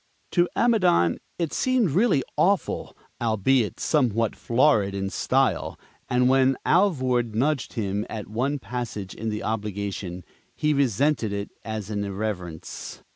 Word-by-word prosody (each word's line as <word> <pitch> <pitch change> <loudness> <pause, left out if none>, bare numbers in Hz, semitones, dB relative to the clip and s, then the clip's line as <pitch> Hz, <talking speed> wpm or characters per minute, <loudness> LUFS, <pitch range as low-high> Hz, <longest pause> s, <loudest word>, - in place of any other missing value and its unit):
To 175 -1 +3
Amidon 180 - +3 0.2
it 170 -3 -2
seemed 255 - +2
really 175 - +3
awful 195 +1 0 0.2
albeit 115 +1 +1
somewhat 115 -7 +1
florid 115 -6 +2
in 95 0 -2
style; - - 0 0.3
and 125 0 +3
when 130 0 +4
Alvord 130 - +2
nudged 135 +3 0
him 105 -1 -2
at 110 -2 -5
one 130 +7 -1
passage 110 -5 -5
in 110 +1 -4
the 105 0 -3
obligation, 100 -4 -3 0.3
he 150 0 +1
resented 140 -3 +1
it 100 0 -4
as 110 -2 -5
an 100 -1 -1
irreverence. 95 -5 -5
115 Hz, 130 wpm, -25 LUFS, 100-145 Hz, 0.3 s, when